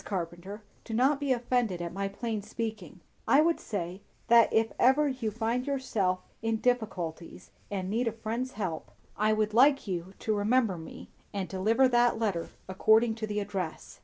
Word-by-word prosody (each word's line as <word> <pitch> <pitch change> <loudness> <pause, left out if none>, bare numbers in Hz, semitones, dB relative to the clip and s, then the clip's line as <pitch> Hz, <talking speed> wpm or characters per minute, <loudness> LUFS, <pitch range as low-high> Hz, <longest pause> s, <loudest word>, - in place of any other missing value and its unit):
Carpenter, 185 +2 -5 0.2
do 225 - -5
not 270 +4 +3
be 285 -2 -1
offended 240 -6 0
at 175 0 -5
my 195 +1 -2
plain 215 +2 -4
speaking; 215 -4 -6 0.3
I 280 - +6
would 335 +1 +2
say, 185 -2 -5 0.3
that 235 0 +6
if 225 0 +2
ever 270 +4 +5
you 260 -5 -2
find 230 +4 -2
yourself 215 -10 0 0.2
in 225 0 0
difficulties 175 - -2 0.2
and 190 -2 -3
need 230 +5 0
a - - +1
friend's 230 +4 -4
help, 185 -7 -4 0.3
I 215 +1 +2
would 215 0 0
like 275 +4 +5
you 185 -1 -4
to 215 - -1
remember 210 -2 +2
me, 160 - -10 0.2
and 195 -2 -2
deliver 220 +7 +3
that 240 -1 +3
letter 200 -7 -1 0.2
according 220 +4 +3
to 220 -1 -5
the 210 0 -2
address." 195 -5 -5
220 Hz, 170 wpm, -29 LUFS, 190-240 Hz, 0.3 s, I